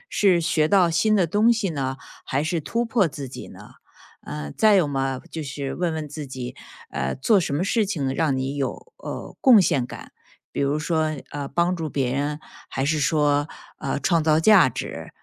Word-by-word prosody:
是 190 -4 +4
学 155 -1 +2
到 185 -1 +4
新 215 +6 +3
的 190 -4 +3
东 210 +7 +4
西 220 -4 -1
呢， 135 -3 -3 0.3
还 140 +2 -1
是 160 +2 -1
突 230 +10 -1
破 225 -5 +2
自 140 -2 -7
己 - - -9
呢？ - - -13 0.5
呃， 75 -1 -6
再 215 -1 +5
有 180 -6 +3
嘛， 135 -2 -1
就 160 - -4
是 140 -1 -5
问 175 -1 -1
问 155 -1 -4
自 150 +1 -7
己， 130 -2 -6 0.4
呃， 65 +1 -2
做 200 - +3
什 150 - -2
么 150 - 0
事 220 +3 +2
情 145 -9 -2
让 150 -5 +1
你 135 +2 -2
有， 145 - -4
呃， - - -7
贡 255 -6 +8
献 135 -8 +1
感， - - -10 0.4
比 - - -2
如 140 +2 +1
说， 155 -2 0
呃， 145 -1 -4
帮 175 +5 +1
助 160 -3 -4
别 135 -3 -1
人， 145 +2 -2 0.3
还 135 - -2
是 155 +2 +1
说， 145 0 +2 0.3
呃， 140 -1 -2
创 165 +1 +2
造 155 0 +4
价 185 -5 +6
值。 115 - -6
155 Hz, 215 characters per minute, -23 LUFS, 140-180 Hz, 0.5 s, 贡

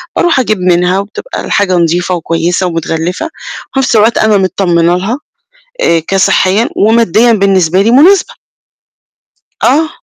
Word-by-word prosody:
باروح 340 -6 +1
أجيب 215 -6 -1
منها 180 +1 +1
وبتبقى 210 - -7
الحاجة 195 -3 0
نضيفة 175 +2 0
وكويسة 170 +2 -2
ومتغلفة، 165 - -3
وفي 295 -3 -8
نفس 250 -3 0
الوقت 220 +2 +3
أنا 215 -1 +2
متطمنة 175 -2 0
لها، 225 +9 -3 0.6
آآ 165 - +2
كصحيًا 195 +2 +1
وماديًا 230 +1 +2
بالنسبة 190 -3 +1
لي 225 +3 +1
مناسبة. 345 +10 +3 1.3
آه. 310 +4 +2
195 Hz, 125 wpm, -10 LUFS, 175-230 Hz, 1.3 s, الوقت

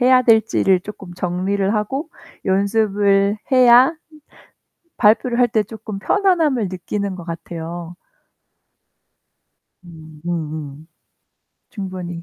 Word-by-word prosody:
해야 255 0 +5
될지를 220 -5 +3
쪼끔 195 -2 -10
정리를 190 +3 -1
하고 265 - -2 0.4
연습을 200 0 +2 0.2
해야 255 +4 +6 1.0
발표를 235 +3 +3
할 245 -1 +4
때 215 -1 +1
쪼끔 215 -1 -8
편안함을 320 - +1
느끼는 195 +2 -4
것 175 -2 -9
같아요. 170 0 -7 1.9
음 160 -3 -14
음음. 155 -3 -5 0.8
충분히. 185 -4 -6
200 Hz, 200 characters per minute, -19 LUFS, 175-225 Hz, 1.9 s, 해야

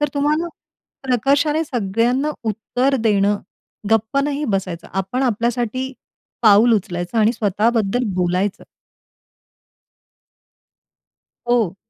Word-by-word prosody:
तर 295 - +1
तुम्हाला 300 +4 +1 0.6
प्रकर्षाने 285 +5 +2
सगळ्यांना 245 +4 0
उत्तर 245 +5 0
देणं, 205 0 +3 0.5
गप्प 225 +4 +2
नाही 290 +1 -2
बसायचं. 180 -3 -4
आपण 195 +8 -2
आपल्यासाठी 240 +2 -1 0.5
पाऊल 220 +2 +6
उचलायचं 175 +2 -2
आणि 220 +2 +4
स्वतःबद्दल 220 +2 0
बोलायचं. 185 +2 0 2.9
हो. 225 -7 +2
230 Hz, 85 wpm, -20 LUFS, 200-265 Hz, 2.9 s, पाऊल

